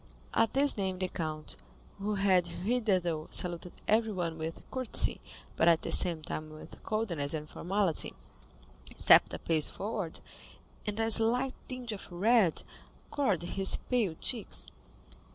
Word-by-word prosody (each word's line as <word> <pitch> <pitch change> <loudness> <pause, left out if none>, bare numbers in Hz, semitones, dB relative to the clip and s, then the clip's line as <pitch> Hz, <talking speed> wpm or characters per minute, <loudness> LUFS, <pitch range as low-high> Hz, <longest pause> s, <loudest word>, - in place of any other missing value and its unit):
At 225 0 +2
this 280 -2 +2
name 190 -2 -1
the 185 0 -1
count, 155 -3 -5 0.4
who 205 +1 -2
had 190 -3 +3
hitherto 185 -5 -1
saluted 175 0 -1
everyone 195 -7 0
with 160 +1 -6
courtesy, 255 -2 +1 0.3
but 165 - +2
at 165 -1 +4
the - - -3
same 170 -4 +2
time 155 +1 -5
with 155 0 -12
coldness 170 -10 -2
and 150 -1 -5
formality, 185 0 -1 0.8
stepped - - +6
a - - -3
pace 160 -2 +2
forward, 200 -5 -4 0.7
and 210 +1 -3
a 225 0 +1
slight 245 +4 +5
tinge 255 -2 -5
of 200 -3 -8
red 195 -1 +3 0.5
colored 210 - 0
his 195 +2 +2
pale 225 -10 -1
cheeks. - - -2
190 Hz, 135 wpm, -31 LUFS, 165-225 Hz, 0.8 s, stepped